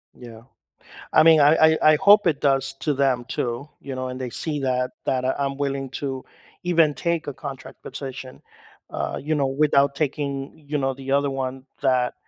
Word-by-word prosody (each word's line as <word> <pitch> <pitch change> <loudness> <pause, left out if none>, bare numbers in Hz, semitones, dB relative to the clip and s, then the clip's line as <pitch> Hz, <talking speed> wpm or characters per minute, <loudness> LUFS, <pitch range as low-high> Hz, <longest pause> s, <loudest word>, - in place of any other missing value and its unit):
Yeah, 115 -2 -12 0.7
I - - +7
mean, 160 -1 +7
I 145 +2 +6
I 160 0 +5 0.2
I - - +5
hope 205 0 +6
it 150 -4 0
does 135 -1 +1
to 150 - 0
them 130 -3 +1
too, 125 +2 -3
you 135 -1 -7
know, 130 0 -3
and 130 0 -6
they 130 -1 -4
see 150 +4 -4
that 125 -1 0
that 130 -1 0
I'm 140 -1 -2
willing 140 -1 -2
to 135 -1 -5 0.4
even 165 -4 +3
take 170 +1 -2
a 145 - -3
contract 135 -2 -9
position, 135 -1 -8 0.5
uh, - - -3
you 155 +3 -1
know, 140 -2 +1
without 140 0 +2
taking, 140 0 -3
you 150 0 -1
know, 135 -1 0
the 135 0 -7
other 140 0 +2
one 130 -1 -4 0.2
that, 130 -3 +1
140 Hz, 185 wpm, -23 LUFS, 130-150 Hz, 0.7 s, I